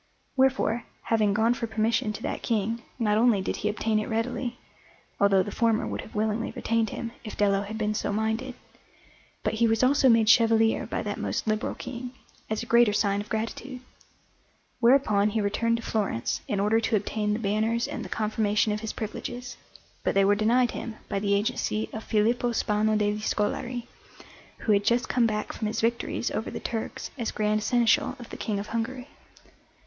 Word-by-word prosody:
Wherefore, 265 -3 +2 0.2
having 215 -3 +2
gone 225 +2 +3
for 235 -1 -3
permission 220 +1 0
to 215 - -8
that - - -3
King, 225 +1 -1 0.2
not 215 -3 +2
only 230 -3 +4
did 190 - -2
he 210 - -1
obtain 215 +1 0
it 215 - -4
readily 240 +2 -2 0.6
(although 195 -2 +4
the 205 - -6
former 225 0 +1
would - - -4
have - - -13
willingly 215 +1 0
retained 225 -1 0
him, 230 +2 -5
if 215 - -7
Dello 200 -1 +3
had 210 +2 -6
been 215 -1 0
so 210 - -2
minded), 220 +4 -1 0.9
but - - 0
he 230 +1 +3
was 225 +2 +2
also 270 +1 +5
made 225 -2 +5
chevalier 225 0 +4
by - - -3
that - - -4
most - - -2
liberal 215 -1 -1
King, 250 0 -7 0.4
as 220 +1 -1
a - - -7
greater 235 -2 +4
sign 200 -1 +1
of 210 - -10
gratitude. 235 +4 -4 1.0
Whereupon 235 -5 +4
he 220 +1 -1
returned 230 +3 +1
to 230 - -7
Florence 200 - -1
in 205 - -1
order 210 +3 +3
to 225 - 0
obtain 210 +1 -1
the 210 - -1
banners 220 +2 0
and - - -5
the - - -8
confirmation 215 0 +1
of 210 - -2
his 220 0 -4
privileges, 245 +3 -5 0.5
but - - 0
they 195 0 +5
were 200 - +5
denied 235 +4 +3
him 230 -2 -6
by 195 - -1
the 200 0 +1
agency 215 +1 -1
of 220 - -5
Filippo 235 +3 +1
Spano 215 0 +1
degli 210 0 0
Scolari, 235 +3 -1 0.8
who 220 - +1
had 200 -1 +4
just 240 +3 +2
come 245 -2 +3
back 210 -1 -2
from 215 - -3
his 215 - -2
victories 235 +1 -1
over 220 - -3
the - - -5
Turks 225 -2 -4
as 230 - -1
Grand 215 0 0
Seneschal 235 +1 +2
of 240 -2 -11
the - - -6
King 210 -2 -2
of 200 - -3
Hungary. 245 +3 -3
220 Hz, 190 wpm, -27 LUFS, 210-235 Hz, 1.0 s, also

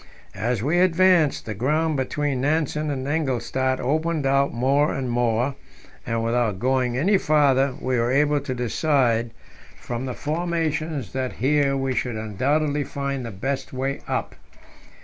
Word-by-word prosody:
As 115 +1 -1
we 160 +6 +2
advanced, 180 -3 +3
the 110 - -4
ground 150 +8 0
between 135 0 -1
Nansen 150 +1 0
and 135 -2 -3
Engelstad 130 -3 0
opened 155 +2 0
out 140 +1 +2
more 135 +5 +2
and 135 -1 -3
more, 120 +2 +1 0.5
and 115 0 -1
without 115 -3 0
going 125 +2 0
any 190 +8 +3
farther 140 -4 +3
we 130 -1 0
were 115 +1 +1
able 145 +2 +3
to 135 -2 -4
decide 120 -1 +1 0.5
from 120 +2 -4
the 125 - -4
formations 155 - -2
that 130 -1 -2
here 140 +1 +1
we 135 -1 -1
should 125 -2 -2
undoubtedly 140 +8 0
find 140 -2 -4
the 115 - -5
best 130 +9 -4
way 135 +1 -2
up. - - -2
135 Hz, 150 wpm, -23 LUFS, 125-150 Hz, 0.5 s, advanced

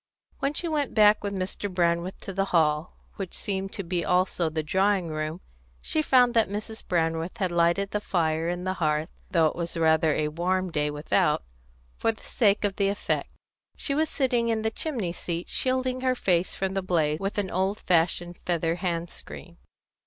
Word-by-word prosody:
When 280 +2 -1
she 345 - -1
went 300 -4 -1
back 210 -1 +6
with 200 - -2
Mr. 195 +1 -3
Brandreth 175 0 0
to 195 - -6
the 195 +1 +1
hall, 160 -3 +1 0.2
which 190 -3 -5
seemed 195 -1 -3
to 200 - -4
be 175 0 -1
also 180 -2 +1
the 155 0 -2
drawing 190 +2 +1
room, 155 +2 -3 0.4
she 315 - 0
found 250 -5 +4
that 225 -5 +3
Mrs. 215 +2 -5
Brandreth 165 0 -1
had 185 -3 0
lighted 170 +3 +2
the 210 - -1
fire 165 -3 0
on 175 0 -3
the 185 0 -1
hearth, 155 +1 +1 0.2
though 170 -4 +3
it 155 - +1
was 170 0 -4
rather 160 -1 +4
a 150 -1 0
warm 180 +3 -1
day 150 -1 0
without, 150 - +1 0.6
for 225 - +2
the 220 - -16
sake 210 -4 +2
of 200 -2 0
the 200 - +2
effect. 200 - -1 0.5
She 280 - -2
was 310 +2 +1
sitting 245 -4 +1
in 220 -1 0
the 220 - 0
chimney 225 - -2
seat, 170 0 -4
and - - -15
shielding 255 0 0
her 255 -1 +2
face 180 -6 +1
from 190 0 -2
the 195 - 0
blaze 160 -4 +1
with 195 +2 -3
an 200 -2 -1
old 190 +3 0
fashioned 175 0 +1
feather 170 -1 0
hand 170 -2 -2
screen. - - -10
185 Hz, 195 wpm, -27 LUFS, 165-205 Hz, 0.6 s, back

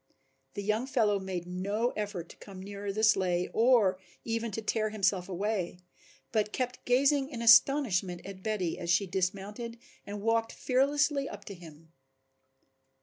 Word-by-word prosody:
The 205 - -4
young 215 +5 0
fellow 220 -6 +2
made 185 -2 -4
no 200 +7 -1
effort 205 -5 -4
to - - -12
come 195 -2 -11
nearer 200 0 -5
the 215 +2 -3
sleigh 180 -5 +3
or 220 -6 +4 0.3
even 230 0 -2
to 225 - -2
tear 215 0 0
himself 195 -3 0
away, 190 -1 -2 0.5
but 210 -2 0
kept 250 +1 -3
gazing 270 +2 +3
in 235 -5 -5
astonishment 225 -7 +4
at 195 -1 -9
Betty 195 -5 -2
as 170 - -5
she 185 +4 +3
dismounted 200 +5 -3 0.3
and 205 0 -7
walked 225 0 +1
fearlessly 280 +2 +1
up - - -10
to 200 - -7
him. 165 -2 -14
210 Hz, 150 wpm, -30 LUFS, 185-235 Hz, 0.5 s, or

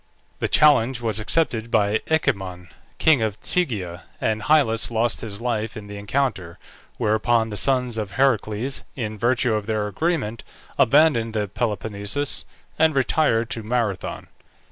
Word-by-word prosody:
The - - 0
challenge 135 -5 +4
was 110 -2 -1
accepted 115 -2 0
by 105 -1 +2
Echemon, 95 - -1 0.3
king 155 -6 +4
of 110 -2 -2
Tegea, 100 - -2
and 110 -1 -1
Hyllus 120 -4 +2
lost 115 0 0
his 100 -3 -6
life 115 -3 -2
in 105 - -8
the 105 0 -8
encounter, 100 -6 -2 0.4
whereupon 110 +1 +1
the - - -4
sons 125 -1 0
of 100 -2 -5
Heracles, 125 0 0
in 110 -4 -4
virtue 120 +2 +1
of 105 -1 -2
their 110 -2 0
agreement, 115 - -2 0.4
abandoned 120 -5 +4
the 105 -1 0
Peloponnesus 105 +5 -2 0.3
and 160 -1 +4
retired 125 -4 +1
to 115 - -3
Marathon. 110 -3 -2
115 Hz, 140 wpm, -23 LUFS, 105-130 Hz, 0.4 s, challenge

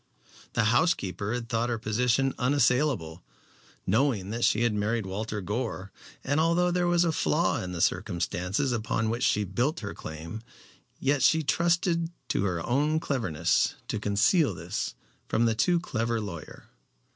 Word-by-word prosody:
The 115 - +2
housekeeper 105 - +1
had 120 -1 -3
thought 115 0 0
her 120 - -1
position 120 +4 +1
unassailable, 125 - +1 0.6
knowing 110 -3 +1
that 115 +1 -3
she 115 - +3
had 120 -2 +2
married 105 +1 -1
Walter 105 +2 -4
Gore; 105 -1 -4 0.3
and 145 +3 +1
although 170 +2 +3
there 175 0 +1
was 175 0 +3
a 165 - +2
flaw 160 +2 +1
in 90 - -5
the 85 -2 -4
circumstances 90 +9 0
upon 115 -1 -1
which 120 +1 -3
she 105 -4 +2
built 120 - -1
her 100 - -5
claim, 80 +7 -7 0.6
yet 140 0 +1
she 160 +4 +4
trusted 170 +2 +1 0.2
to 100 - +1
her 85 -4 -2
own 150 +5 +1
cleverness 90 - 0
to 110 - -1
conceal 105 - +2
this 85 +5 -4 0.3
from 115 - +2
the 115 - +3
too 170 +11 +2
clever 115 -8 -1
lawyer. 90 -7 -8
115 Hz, 155 wpm, -28 LUFS, 100-145 Hz, 0.6 s, she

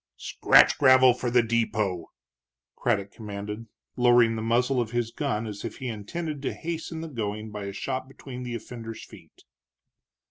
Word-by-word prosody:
"Scratch - - +4
gravel 130 -2 +7
for 125 0 -3
the 120 0 +4
depot!" 110 -6 -1 0.7
Craddock 100 -4 0
commanded, 105 +1 -7 0.3
lowering 120 -2 +5
the 110 - -3
muzzle 125 +3 +2
of 115 - -3
his 120 -1 -1
gun 125 -5 -2
as 105 -2 -7
if - - -6
he 130 - -4
intended 145 +8 -5
to 135 - -2
hasten 165 -1 -5
the 165 - -5
going 110 -5 -4
by 105 -1 -6
a 100 - -4
shot 130 +6 -4
between 130 -1 -9
the 120 -1 -4
offender's 115 0 -8
feet. - - -17
115 Hz, 165 wpm, -26 LUFS, 110-130 Hz, 0.7 s, gravel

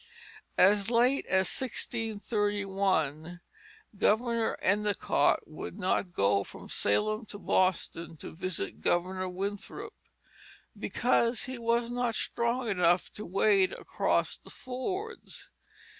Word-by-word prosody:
As 200 +2 +5
late 245 +3 +3
as 190 0 +3
1631 200 - -1 0.6
Governor 230 +3 +1
Endicott 205 -7 +2
would 155 +4 -8
not 185 -1 0
go 100 - +2
from - - -11
Salem 215 - +1
to 205 - -8
Boston 175 -4 0
to - - -9
visit 165 - -3
Governor 185 - 0
Winthrop 195 +2 -5 0.8
because 235 -1 +1
he 260 -2 -5
was 235 0 +1
not 245 -2 0
strong 235 +2 0
enough 180 -3 +2
to 210 - -7
wade 195 +1 +3
across - - 0
the - - -16
fords. 370 - -6
205 Hz, 105 wpm, -30 LUFS, 180-235 Hz, 0.8 s, As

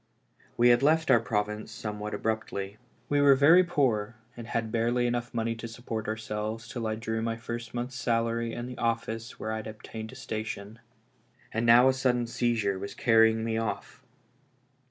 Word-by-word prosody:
We 120 +1 +6
had 120 +1 +5
left 160 +3 +3
our - - +7
province 105 0 -2
some 105 -2 -5
what 105 +1 -4
abruptly; 105 -2 -3 0.3
we 145 0 +2
were 140 -1 +7
very 160 +7 +7
poor, 120 -10 0 0.2
and 120 -1 -8
had 115 -2 -2
barely 120 +2 +1
enough 120 0 -1
money 115 -1 -1
to 115 +1 -7
support 115 -1 -5
ourselves 110 +1 -4
till 115 -2 -4
I 110 - -1
drew 110 0 -3
my 115 0 -1
first 115 0 -6
month's 125 +1 -4
salary 115 -1 0
in 120 - -5
the 125 -1 -8
office 115 -1 -2
where 110 - -3
I 110 - -2
had 110 - -6
obtained 110 0 -8
a - - -12
situ - - -5
ation. 110 0 -6 0.7
And 115 +1 -1
now 120 +2 +8
a 130 - +5
sudden 125 -2 +1
seizure 115 -5 0
was 100 +1 -6
carrying 110 -2 +4
me 110 0 -1
off! 115 -1 -4
115 Hz, 185 wpm, -28 LUFS, 110-120 Hz, 0.7 s, now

